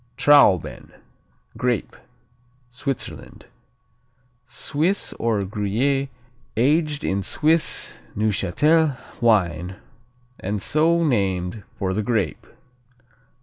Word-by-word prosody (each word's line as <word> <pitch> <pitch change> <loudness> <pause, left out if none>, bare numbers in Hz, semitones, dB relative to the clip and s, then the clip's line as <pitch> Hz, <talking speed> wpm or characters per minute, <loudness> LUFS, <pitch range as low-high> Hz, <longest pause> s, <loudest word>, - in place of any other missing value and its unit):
Trauben 140 - +3 0.6
(Grape) 125 -4 -1 0.7
Switzerland 135 +1 -6 1.0
Swiss 155 +9 -1
or 115 -3 0
Gruyère 115 +8 -1 0.5
aged 150 +4 +1
in 100 +1 0
Swiss 155 - +1 0.2
Neuchâtel 130 - +2 0.2
wine 90 -6 +1 0.6
and 100 +2 -3
so 165 - +2
named 95 - 0
for 95 -1 -2
the 105 - -1
grape. 105 -5 -2
120 Hz, 75 wpm, -22 LUFS, 100-145 Hz, 1.0 s, Trauben